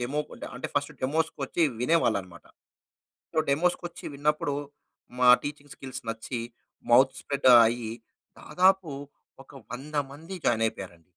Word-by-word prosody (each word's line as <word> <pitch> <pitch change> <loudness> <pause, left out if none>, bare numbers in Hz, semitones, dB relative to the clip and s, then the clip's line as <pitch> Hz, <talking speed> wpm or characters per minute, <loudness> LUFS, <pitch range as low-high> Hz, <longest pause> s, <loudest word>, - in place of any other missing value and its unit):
Demo 135 +5 -1 0.2
ఆహ్, - - -8
అంటే - - -5
first 145 0 -1
డెమోస్‌కొచ్చి 155 +2 -1 0.2
వినేవాళ్ళన్నమాట. 100 - 0 0.9
So, - - -1
డెమోస్‌కొచ్చి 175 +3 -1
విన్నప్పుడు 145 0 0 0.7
మా 125 - +6 0.2
టీచింగ్ 145 -1 -7
స్కిల్స్ 130 -2 -7
నచ్చి 115 +2 -5 0.5
మౌత్ 130 +2 +6
స్ప్రెడ్ 140 -2 +1 0.2
అయ్యి 115 -1 -2 0.5
దాదాపు 185 -2 +2 0.5
ఒక - - -19 0.2
100 140 +5 -8 0.2
మంది 165 +6 -8
జాయిన్ 115 -1 +3
అయిపోయారండి. 90 -6 -10
140 Hz, 120 wpm, -27 LUFS, 120-155 Hz, 0.9 s, మా